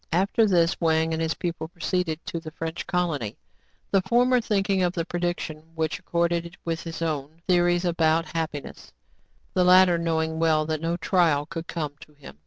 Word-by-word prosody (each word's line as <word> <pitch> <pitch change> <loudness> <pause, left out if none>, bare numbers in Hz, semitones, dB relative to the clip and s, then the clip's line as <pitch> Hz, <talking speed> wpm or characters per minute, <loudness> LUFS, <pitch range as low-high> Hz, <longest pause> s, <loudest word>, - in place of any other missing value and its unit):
After 195 +6 +3
this, 170 -3 +2
Wang 160 0 +2
and 160 - -1
his 160 0 0
pupil 170 -2 -4
proceeded 170 -1 -2
to 170 - -4
the 160 -1 -8
French 165 +2 -5
colony, 160 - -1 0.3
— - - -41
the 195 - +4
former 245 +5 +3
thinking 195 -3 +1
of 180 -1 +1
the 165 -2 -2
predic 175 0 -2
tion, 155 -1 -6
which 160 -1 -1
accorded 170 0 -1
with 165 0 -2
his 165 0 -5
own 155 0 -3
theories 175 -1 +3
about 165 -1 +2
happiness; 155 -4 -5 0.6
the 185 - +3
latter 180 -1 +6
knowing 160 -1 -1
well 160 -2 +3
that 155 0 -2
no 165 +1 -1
trial 165 -5 +2
could 165 +2 -6
come 150 -4 -3
to 150 - -15
him. 140 - -13
165 Hz, 185 wpm, -25 LUFS, 160-180 Hz, 0.6 s, latter